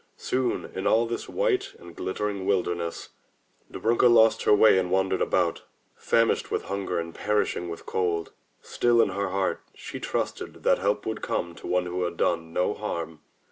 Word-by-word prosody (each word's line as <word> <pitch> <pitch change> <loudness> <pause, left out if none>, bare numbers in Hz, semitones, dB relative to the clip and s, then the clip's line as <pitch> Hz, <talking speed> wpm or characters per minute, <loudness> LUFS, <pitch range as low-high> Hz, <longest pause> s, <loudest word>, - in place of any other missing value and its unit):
Soon 130 -1 -1
in 95 - -2
all 115 +1 +4
this 115 0 -5
white 435 -6 0
and 85 -1 -13
glit 95 - -4
tering 105 -2 -2
wilderness, 90 -3 -1 0.6
Dobrunka 120 +2 +3
lost 115 -1 +5
her - - +6
way 105 -2 +6
and 90 -1 -1
wandered 95 0 +1
about, - - +1 0.3
famishing 115 0 +1
with - - -1
hunger 95 -2 -3
and 85 0 -5
perishing 105 -4 -1
with 85 - -7
cold. 85 -3 -1 0.3
Still 120 -1 +2
in 115 - +4
her 100 +1 -2
heart 95 0 -1
she - - -8
trusted - - -4
that - - +3
help 100 +2 0
would 110 - -3
come 85 -1 -2
to - - -10
one 90 0 +1
who 90 +1 -3
had 85 -1 -2
done 80 -2 0
no 90 +4 +1
harm. 85 -7 -5
95 Hz, 180 wpm, -26 LUFS, 85-110 Hz, 0.6 s, her